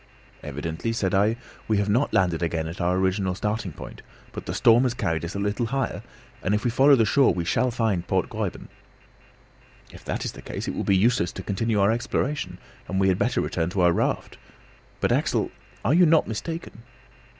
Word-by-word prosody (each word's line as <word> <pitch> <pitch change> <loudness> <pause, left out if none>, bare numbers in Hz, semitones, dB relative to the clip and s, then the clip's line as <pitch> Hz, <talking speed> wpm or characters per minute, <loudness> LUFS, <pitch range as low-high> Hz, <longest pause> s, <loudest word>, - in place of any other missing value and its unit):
"Evidently," 80 - -4
said 100 -5 -1
I, 105 +4 +3 0.3
"we 110 - +2
have 100 0 0
not 120 +7 +2
landed 90 -4 +1
again 80 -1 -1
at 85 +3 -6
our 90 +1 +1
original 95 0 0
starting 105 -1 -2
point, 70 - -10 0.3
but - - -8
the - - -2
storm 115 +1 +5
has 125 -2 0
carried 80 -9 -1
us 85 +3 -5
a - - -2
little 105 +4 -1
higher, 135 +1 -2 0.4
and 100 +3 +1
if 105 - -2
we 120 - +2
follow 135 +4 +6
the 115 -4 +3
shore 135 +5 +4
we 85 -2 -2
shall 125 +8 +1
find 110 -7 -1
Port - - +1
Gräuben." - - -4 1.3
"If - - -13
that - - -3
is - - -2
the - - -12
case - - -6
it - - -2
will - - -3
be 95 - +3
useless 110 -3 +2
to 95 - -7
continue 105 +3 0
our 100 +2 +4
exploration, 135 +5 -2 0.3
and 95 - -1
we 95 0 +3
had 95 0 +1
better 125 0 +1
return 80 -1 -1
to 95 +1 -1
our 90 -1 +5
raft. - - -1 0.6
But, - - +2
Axel, - - +1 0.3
are 135 - +3
you 175 +1 +6
not 160 0 +4
mistaken?" 160 +3 -5
100 Hz, 205 wpm, -25 LUFS, 90-120 Hz, 1.3 s, follow